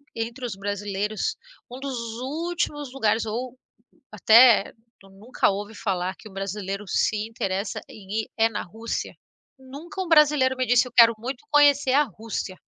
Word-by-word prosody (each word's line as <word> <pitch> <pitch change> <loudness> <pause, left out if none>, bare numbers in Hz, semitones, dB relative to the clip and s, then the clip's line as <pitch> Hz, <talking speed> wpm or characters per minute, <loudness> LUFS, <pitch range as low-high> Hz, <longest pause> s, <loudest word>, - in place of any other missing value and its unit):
entre 230 +3 -4
os 235 - -4
brasileiros, 205 +1 -3 0.4
um 250 - -8
dos 275 -1 -4 0.3
últimos 295 -1 -3
lugares 225 -4 +1
ou, 240 +3 -5 0.5
até, 220 +2 +6 0.3
tu 195 - -19
nunca 205 +6 -1
ouve 205 +2 -4
falar 185 -3 -2
que 215 - -13
um - - -17
brasileiro 195 +1 -4
se 215 +3 0
interessa 195 -2 -3
em 210 +1 -4
ir - - -13
é 225 0 +4
na 220 - -4
Rússia? 225 +6 -5 0.4
Nunca 285 +9 -8
um - - -8
brasileiro 300 -5 +4
me 255 - 0
disse: 245 +1 +4
"Eu - - -12
quero 235 -1 +8
muito 245 +4 -6
conhecer 285 -3 +4
a 290 +2 +5
Rússia". 220 - -6
225 Hz, 160 wpm, -24 LUFS, 205-265 Hz, 0.5 s, quero